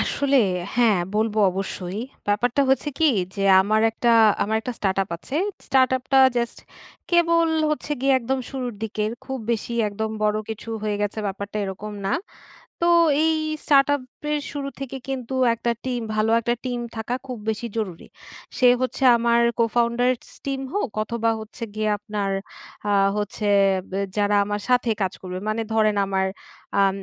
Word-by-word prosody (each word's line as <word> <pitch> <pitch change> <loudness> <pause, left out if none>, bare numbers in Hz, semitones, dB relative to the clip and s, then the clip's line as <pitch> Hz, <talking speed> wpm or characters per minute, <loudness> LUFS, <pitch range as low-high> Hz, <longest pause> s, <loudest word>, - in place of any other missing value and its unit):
আসলে 280 -1 +1 0.4
হ্যাঁ, 225 -5 +4 0.2
বলবো 220 0 +1
অবশ্যই। 190 +1 -4 0.3
ব্যাপারটা 240 +6 +2
হচ্ছে 270 +2 +1
কী 320 -2 +5 0.2
যে 195 - -2 0.2
আমার 215 +3 +2
একটা 235 +1 +1 0.3
আমার 220 +2 0
একটা 250 +3 -4
স্টার্টআপ 195 -1 0
আছে। 265 - -6 0.3
স্টার্ট 260 -1 +4
আপ 255 - -8
টা 270 - +7 0.2
জাস্ট 235 0 -1 0.5
কেবল 335 -1 +4 0.2
হচ্ছে 300 -1 -2
গিয়ে 270 +1 +3
একদম 260 +3 -1
শুরুর 255 -4 -4
দিকে 215 -1 -2 0.2
খুব 265 0 -4
বেশি 230 +1 -3 0.2
একদম 220 +2 -3
বড় 210 0 +2
কিছু 220 +1 -7
হয়ে 210 -1 -1
গেছে 205 +1 -2
ব্যাপারটা 200 +1 -5
এরকম 200 +2 -6
না। 195 - 0 0.7
তো 340 - +3 0.3
এই 320 0 +3 0.3
স্টার্ট 275 -2 +5
আপ 285 - -5 0.3
এর 300 - +1
শুরু 280 -1 -4
থেকে 270 -1 -5
কিন্তু 265 -1 -4 0.2
একটা 235 +1 -1
টিম, 250 -2 -2
ভালো 215 +1 +2
একটা 235 +1 0
টিম 245 -1 -2 0.2
থাকা 225 +2 -2
খুব 250 -2 -5
বেশি 220 +2 -2
জরুরি। 190 -7 -4 0.5
সে 255 - +5
হচ্ছে 255 +1 -2
আমার 235 0 +3 0.2
co-founder 235 +2 +2 0.3
স - - -10
টিম 270 -1 -2
হোক 405 -10 -1
অথবা 230 +1 0
হচ্ছে 220 +1 -8
গিয়ে 215 0 0
আপনার 205 -1 -3 0.6
আ - - +2 0.3
হচ্ছে 210 +1 -2 0.4
ব্যা 195 +1 -1 0.2
যারা 205 0 +2
আমার 205 0 -3
সাথে 245 -1 +3
কাজ 190 -1 0
করবে। 185 -1 -5
মানে 215 +1 -1
ধরেন 215 -1 +3
আমার 190 0 0 0.6
আম 195 -1 +3
225 Hz, 165 wpm, -23 LUFS, 205-255 Hz, 0.7 s, টা